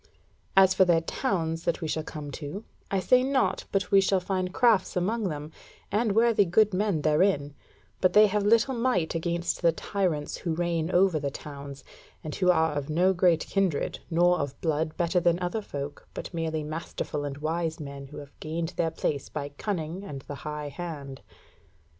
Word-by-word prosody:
As 190 -1 +7
for - - +5
their 170 -3 +3
towns 165 -4 -2
that 170 - 0
we 160 - -3
shall 155 - -1
come 150 -2 -7
to, 150 +9 -6 0.3
I 195 - +1
say 250 +6 +4
not 265 0 +1
but 195 -2 -1
we 195 -1 +7
shall 190 0 +2
find 185 0 -2
crafts 230 -1 +3
amongst 200 +3 0
them, 150 0 -6 0.4
and 210 +1 +1
worthy 225 -2 +5
good 200 +3 +3
men 185 -5 0
therein, 150 -2 +2 0.5
but 185 -1 +3
they 210 +1 +8
have 210 0 0
little 230 +5 +4
might 235 -9 0
against 170 +1 -1
the 170 -2 +5
tyrants 165 -4 -2
who 165 -2 -2
reign 170 -1 -1
over 180 -3 +3
the 140 -1 -2
towns, 140 -1 -9 0.4
and 155 - -5
who 180 -2 +1
are 160 -3 +3
of 145 0 -3
no 180 +5 +3
great 175 -2 +3
kindred, 190 -7 0
nor 175 +1 +3
of 140 -1 -4
blood 155 -1 -1
better 175 +1 +2
than 170 0 +3
other 180 +5 -2
folk, 145 -6 -7
but - - -6
merely 160 -2 -2
masterful 155 -1 -4
and 140 -1 -4
wise 160 +2 -2
men 140 -2 -7
who 145 - -11
have 140 -1 -11
gained 165 +1 -3
their 165 - +2
place 145 -3 -3
by 145 -1 -4
cunning 170 +3 -4
and 140 -9 -7
the - - -7
high 150 -1 -5
hand. 145 -5 -7
170 Hz, 185 wpm, -27 LUFS, 150-190 Hz, 0.5 s, they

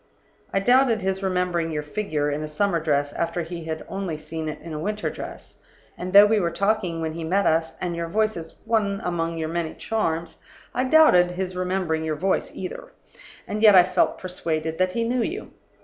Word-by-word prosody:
I 195 - +2
doubted 245 0 +3
his 190 0 -1
remembering 180 -3 0
your 150 -1 -2
figure 150 -3 -2
in 145 +1 -2
a 155 - -4
summer 170 +3 0
dress 145 -2 0
after 170 +1 -2
he 170 0 -7
had 160 -1 -5
only 190 -5 -4
seen 155 +1 -5
it 155 - -6
in 165 0 -8
a 150 - -4
winter 210 +6 -2
dress; - - -9 0.3
and 180 +1 -5
though 200 +2 +9
we 215 +1 +3
were 175 -3 +1
talking 195 -2 0
when 160 -1 -2
he 165 0 -5
met 190 +5 +1
us, 160 0 +1
and 175 -2 -2
your 170 0 -3
voice 215 +5 +1
is 165 -1 -8
one 210 -3 +1
among 165 -1 -2
your 160 -1 -2
many 165 -1 -2
charms, 165 -7 -2 0.3
I 255 - 0
doubted 255 - +6
his 185 0 -4
remembering 180 -3 -1
your 155 -1 -1
voice, 190 +5 0
either. 185 - -7 0.5
And 210 - -3
yet 215 -3 +8
I 180 - +9
felt 180 0 +1
persuaded 160 -3 -3
that 185 0 +2
he 230 - 0
knew 245 +1 0
you. 360 - -4
180 Hz, 205 wpm, -24 LUFS, 160-200 Hz, 0.5 s, though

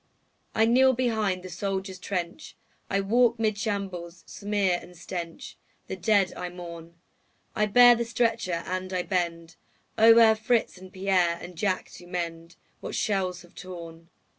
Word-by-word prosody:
I 220 - +4
kneel 260 +3 +5
behind 220 -7 0
the 185 - -8
soldier's 190 +1 -4
trench, 180 - -5 0.3
I 195 0 +1
walk 235 +4 +3
'mid 215 -2 0
shambles' 190 -5 -4
smear 200 -3 -1
and 180 0 -14
stench, 170 -1 -7 0.3
The - - -5
dead 195 0 +2
I 180 - -5
mourn; 170 -1 -10 0.6
I 210 0 +2
bear 245 +3 +8
the 235 0 -1
stretcher 230 -7 -1
and 185 +1 -4
I 180 -1 0
bend 170 -3 -3 0.4
O'er 225 0 +8
Fritz 220 -2 0
and 185 0 -12
Pierre 185 -3 +1
and 180 0 -10
Jack 185 +1 -1
to 175 - -13
mend 170 -1 -5 0.2
What - - -6
shells 185 -3 -1
have 175 - -19
torn. 170 -2 -10
185 Hz, 150 wpm, -27 LUFS, 175-215 Hz, 0.6 s, bear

